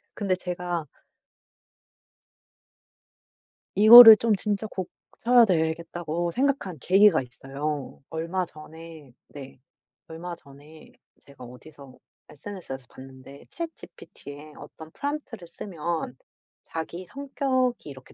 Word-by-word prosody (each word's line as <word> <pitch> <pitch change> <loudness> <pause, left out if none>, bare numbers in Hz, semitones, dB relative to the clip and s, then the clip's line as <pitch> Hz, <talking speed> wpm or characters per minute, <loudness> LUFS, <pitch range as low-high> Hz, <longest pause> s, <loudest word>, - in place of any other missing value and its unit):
근데 195 -3 -1
제가 175 -2 -5 2.9
이거를 225 +2 +11
좀 225 -1 +1
'진짜 210 +1 -1
고쳐야 230 +5 0
되겠다.'고 170 -1 -2
생각한 265 - -2
계기가 195 +1 +4
있어요. 140 +3 -7
얼마 165 +3 -3
전에 160 -3 -14 0.2
네. 135 -2 -12 0.5
얼마 170 +2 -8
전에 145 +2 -17 0.3
제가 140 -2 -15
어디서 130 +2 -15 0.3
SNS에서 150 -5 -9
봤는데 130 +1 -14
ChatGPT에 155 - -11
어떤 160 0 -13
prompt를 285 - -6
쓰면 165 -6 -6 0.5
자기 170 +3 -7
성격이 260 - -2
이렇게 130 -2 -14
170 Hz, 250 characters per minute, -25 LUFS, 150-205 Hz, 2.9 s, 이거를